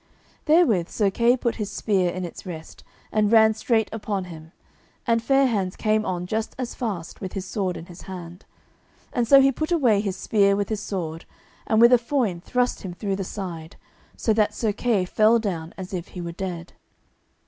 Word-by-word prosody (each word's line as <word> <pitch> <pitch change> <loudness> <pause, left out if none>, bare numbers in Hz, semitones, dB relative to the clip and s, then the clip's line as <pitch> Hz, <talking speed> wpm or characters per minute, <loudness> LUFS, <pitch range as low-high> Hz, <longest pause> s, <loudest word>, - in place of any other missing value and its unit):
Therewith 300 - +4
Sir 205 -3 +1
Kay 235 +4 +3
put 235 -1 -1
his 210 -2 -3
spear 195 -3 +1
in 180 +1 -4
its 170 - -9
rest, 160 -4 -9 0.3
and 215 -1 +2
ran 220 -1 +6
straight 220 0 +1
upon 205 -3 -3
him, 160 -3 -11 0.5
and 230 -1 +2
Fair 270 +3 +3
hands 200 -7 -1
came 215 0 +1
on 180 -1 -2
just 220 +4 -3
as 255 -2 -4
fast 195 -9 -5
with 190 -2 -5
his 195 -2 -4
sword 185 -2 -2
in 165 - -9
his 175 -1 -12
hand. 180 -1 -9 0.7
And 240 -2 0
so 275 +2 +8
he 270 0 +5
put 310 +5 -3
away 245 -12 +3
his 195 -3 -2
spear 200 -2 +3
with 205 0 -2
his 215 -2 -2
sword, 165 -4 -4 0.4
and 220 - +3
with 235 +2 +7
a 245 - +7
foin 230 -8 -1
thrust 250 +5 0
him 180 -3 -7
through 195 0 -2
the 195 - -2
side, 175 -5 -7 0.4
so 220 - +1
that 210 -1 +1
Sir 220 -3 0
Kay 210 -3 +1
fell 215 +5 +4
down 175 -7 -3
as 185 0 -7
if 175 -2 -4
he 180 - -8
were 170 0 -5
dead. 175 -1 -6
205 Hz, 200 wpm, -24 LUFS, 180-230 Hz, 0.7 s, so